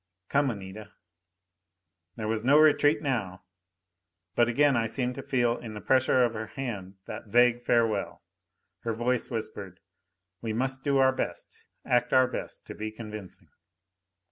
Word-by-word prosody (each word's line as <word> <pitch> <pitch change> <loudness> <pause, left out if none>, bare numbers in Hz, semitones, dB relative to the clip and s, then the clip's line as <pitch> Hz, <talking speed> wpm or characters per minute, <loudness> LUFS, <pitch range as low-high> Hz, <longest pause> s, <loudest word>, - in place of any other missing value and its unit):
"Come, 140 -1 +2
Anita." 100 -1 -8 1.2
There 110 -2 -4
was 110 0 -1
no 140 +4 +5
retreat 155 0 +4
now. 105 -11 -2 0.9
But 120 0 +3
again 140 +3 +3
I 115 -1 +1
seemed 125 +2 -2
to - - -6
feel 120 -3 +1
in 110 -3 -8
the - - -5
pressure 130 +1 +3
of 120 -2 +1
her 110 0 -5
hand 105 -9 -6
that - - -8
vague 120 +2 +4
farewell. 115 -4 0 0.6
Her 115 - -3
voice 120 +2 -1
whispered, 100 -5 -6 0.6
"We 110 -2 -3
must 135 +3 -1
do 140 -1 +2
our 130 0 +4
best, - - -5 0.2
act 125 0 +1
our 130 0 +6
best - - -6
to - - -8
be 110 0 -5
convincing." 110 -3 -10
120 Hz, 150 wpm, -28 LUFS, 110-130 Hz, 1.2 s, our